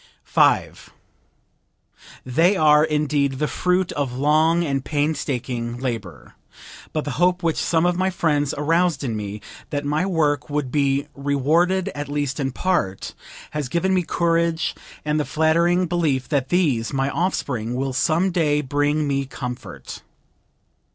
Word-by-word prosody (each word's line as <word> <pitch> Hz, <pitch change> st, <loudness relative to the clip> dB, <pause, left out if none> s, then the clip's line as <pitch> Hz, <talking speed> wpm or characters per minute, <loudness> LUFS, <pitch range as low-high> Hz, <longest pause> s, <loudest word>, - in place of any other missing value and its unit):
"They 165 Hz, +10 st, +3 dB
are, 150 Hz, -2 st, +5 dB
indeed, 150 Hz, -2 st, +1 dB
the 150 Hz, +3 st, -1 dB
fruit 180 Hz, +2 st, 0 dB
of 135 Hz, -4 st, -3 dB
long 155 Hz, +4 st, +3 dB
and 140 Hz, -4 st, -1 dB
painstaking 130 Hz, -6 st, -2 dB
labor; 115 Hz, -, -5 dB, 0.6 s
but 155 Hz, -2 st, -2 dB
the 145 Hz, -, -3 dB
hope 180 Hz, 0 st, +3 dB
which 165 Hz, -2 st, +1 dB
some 165 Hz, 0 st, +1 dB
of 175 Hz, 0 st, +1 dB
my 190 Hz, 0 st, +2 dB
friends 150 Hz, -6 st, 0 dB
aroused 165 Hz, +1 st, +1 dB
in 120 Hz, -5 st, -2 dB
me, 105 Hz, 0 st, -5 dB, 0.3 s
that 145 Hz, -1 st, -3 dB
my 150 Hz, +6 st, 0 dB
work 155 Hz, -5 st, 0 dB
would 145 Hz, -3 st, -2 dB
be 140 Hz, 0 st, +1 dB
rewarded 155 Hz, +7 st, +1 dB
at 145 Hz, 0 st, -6 dB
least 145 Hz, -1 st, -2 dB
in 135 Hz, -1 st, -1 dB
part, 125 Hz, -, -1 dB, 0.4 s
has 150 Hz, -4 st, -3 dB
given 185 Hz, +6 st, +1 dB
me 185 Hz, -, +3 dB
courage 165 Hz, -1 st, 0 dB, 0.3 s
and 150 Hz, 0 st, +1 dB
the -, -, +1 dB
flattering 170 Hz, +4 st, +2 dB
belief 160 Hz, -7 st, 0 dB
that 135 Hz, -3 st, 0 dB
these, 145 Hz, -11 st, +1 dB
my 135 Hz, 0 st, 0 dB
offspring, 125 Hz, -, -2 dB
will 135 Hz, +1 st, -2 dB
some 160 Hz, +8 st, +1 dB
day 150 Hz, -4 st, +1 dB
bring 145 Hz, +2 st, 0 dB
me 140 Hz, -1 st, -1 dB
comfort." 125 Hz, -1 st, -7 dB
150 Hz, 140 wpm, -22 LUFS, 135-165 Hz, 0.6 s, are